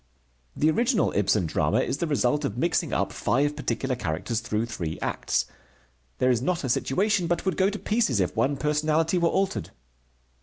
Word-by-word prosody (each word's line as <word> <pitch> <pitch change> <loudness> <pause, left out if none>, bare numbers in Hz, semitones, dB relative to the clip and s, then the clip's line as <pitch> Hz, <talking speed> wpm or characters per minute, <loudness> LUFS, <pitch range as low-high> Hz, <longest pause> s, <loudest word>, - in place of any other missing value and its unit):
The 155 +2 +3
original 235 - +1
Ibsen 105 -1 +2
drama 80 - +1
is 140 - -2
the 170 - -1
result 145 -1 +1
of 105 - -3
mixing 165 +2 0
up 100 0 -1
five 145 +10 +1
particular 130 +1 -2
characters 110 +5 -2
through 115 -1 -2
three 85 -9 -4
acts. - - -1 0.7
There 130 - +3
is 120 -2 +1
not 170 +5 -1
a 130 - -2
situation 185 - +1
but 175 +2 -1
would 190 - 0
go 190 +1 +3
to 210 - -4
pieces 210 - +1
if 90 - 0
one 135 +6 +1
personality 155 +4 +1
were 170 -1 +3
altered. 195 +2 -1
145 Hz, 180 wpm, -26 LUFS, 115-175 Hz, 0.7 s, The